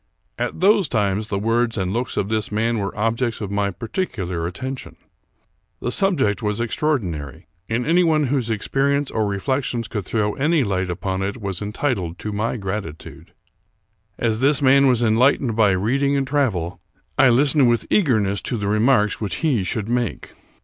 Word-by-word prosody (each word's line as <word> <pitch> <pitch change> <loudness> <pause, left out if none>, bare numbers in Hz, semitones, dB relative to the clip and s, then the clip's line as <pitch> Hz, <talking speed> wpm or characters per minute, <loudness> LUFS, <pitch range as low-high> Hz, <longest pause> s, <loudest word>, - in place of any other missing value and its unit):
At - - -3
those 200 - +4
times 105 -1 0
the 100 - -2
words 115 +2 +1
and 95 -1 -1
looks 120 +3 -2
of 95 - 0
this 110 -1 -1
man 115 +2 0
were 100 0 -4
objects 115 +2 -1
of 100 -2 -5
my 100 0 0
particular 95 - -3
atten 130 +10 -4
tion. 80 -10 -11 0.8
The 120 - -2
subject 170 - +1
was 105 0 -1
extraordinary; 105 - -2 0.2
and 120 +2 -1
anyone 165 -2 +3
whose 130 -3 0
experience 140 +6 0
or 110 -2 0
reflections 120 +3 -2
could 105 -3 -4
throw 105 -2 0
any 155 +1 +2
light 95 -4 -1
upon 95 +1 -3
it 100 +4 -3
was 100 -3 -4
entitled 105 - -2
to 105 - -5
my 110 +4 -2
gratitude. 95 -5 -6 0.9
As 110 -2 0
this 140 +2 +3
man 140 0 +5
was 120 -2 +3
enlightened 120 +1 +3
by 110 -2 +4
reading 135 +9 +1
and 135 - 0
travel, 95 - -1 0.4
I 130 - +7
listened 135 +1 +4
with 120 -1 +1
eagerness 110 - +2
to 120 - -2
the 100 -2 -3
remarks 105 0 +2
which 105 - -2
he 120 -10 +1
should 105 +3 -2
make. 120 -3 -2
115 Hz, 170 wpm, -21 LUFS, 100-130 Hz, 0.9 s, I